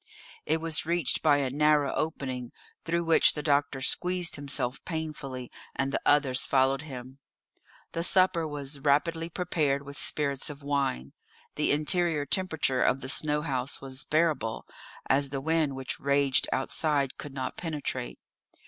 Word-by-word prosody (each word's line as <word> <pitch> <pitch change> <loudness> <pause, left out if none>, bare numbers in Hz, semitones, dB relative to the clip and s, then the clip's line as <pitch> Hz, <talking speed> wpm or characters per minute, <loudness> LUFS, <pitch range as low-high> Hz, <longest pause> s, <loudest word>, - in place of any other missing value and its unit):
It 160 +2 +2
was 165 -1 +1
reached 170 -5 +1
by 150 -2 +4
a 135 -3 -1
narrow 150 0 +3
opening, 130 -6 -3 0.3
through 170 +1 0
which 165 -1 +5
the 150 - -4
doctor 140 -2 +1
squeezed 180 +4 +1
himself 135 -3 -2
painfully, 150 -6 -5 0.2
and 135 +1 -1
the - - 0
others 140 -3 +3
followed 135 0 +2
him. 130 -2 -9 0.7
The 165 - -2
supper 180 -2 +3
was 145 -1 -4
rapidly 165 +4 +1
prepared 155 -6 -1
with 140 0 -7
spirits 140 -1 0
of 145 -1 -9
wine. 140 - -1 0.4
The - - +1
interior 155 0 +1
temperature 155 -6 0
of 135 - +2
the 130 - -3
snow 150 0 +2
house 135 -3 -1
was 135 0 -2
bearable, 155 -8 0 0.4
as 140 +1 +3
the 135 0 -3
wind 155 -1 0
which 135 -1 -3
raged 140 -1 +2
outside 140 0 0
could 145 -2 -7
not 130 -1 -4
penetrate. 145 -6 -4
145 Hz, 150 wpm, -28 LUFS, 135-160 Hz, 0.7 s, which